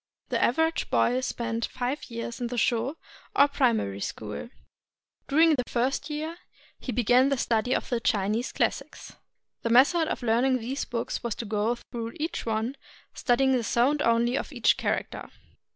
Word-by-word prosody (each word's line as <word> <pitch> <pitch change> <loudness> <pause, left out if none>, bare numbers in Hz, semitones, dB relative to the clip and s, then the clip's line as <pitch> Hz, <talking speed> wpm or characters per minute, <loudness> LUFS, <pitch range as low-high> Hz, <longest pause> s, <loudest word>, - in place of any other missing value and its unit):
The - - +1
average 320 +6 +1
boy 245 +2 +2
spent 235 -2 -2
five 255 +4 -3
years 230 +1 -6
in 240 - -1
the 245 +1 -5
Sho, 240 +7 +1 0.4
or 280 - +6
Primary 230 - +1
School. 105 - -5 0.8
During 320 +3 +5
the 255 -4 0
first 265 +4 -1
year 310 +3 -4 0.4
he 255 - -5
began 245 +3 +4
the 275 - +1
study 235 +1 +1
of - - -2
the 240 -3 0
Chinese 220 +1 0
classics. - - -2 0.5
The 230 - -2
method 290 +8 +5
of - - -3
learning 245 +3 +3
these 255 +4 -3
books 235 -1 -3
was 235 -3 -3
to 235 - -5
go 215 +3 0 0.2
through 230 -2 -4
each 315 -4 -4
one, 225 +5 -1 0.4
studying 265 +2 +2
the 250 -3 +2
sound 260 +6 +2
only 235 0 +2
of - - -3
each - - +3
character. - - -3
245 Hz, 165 wpm, -27 LUFS, 230-270 Hz, 0.8 s, or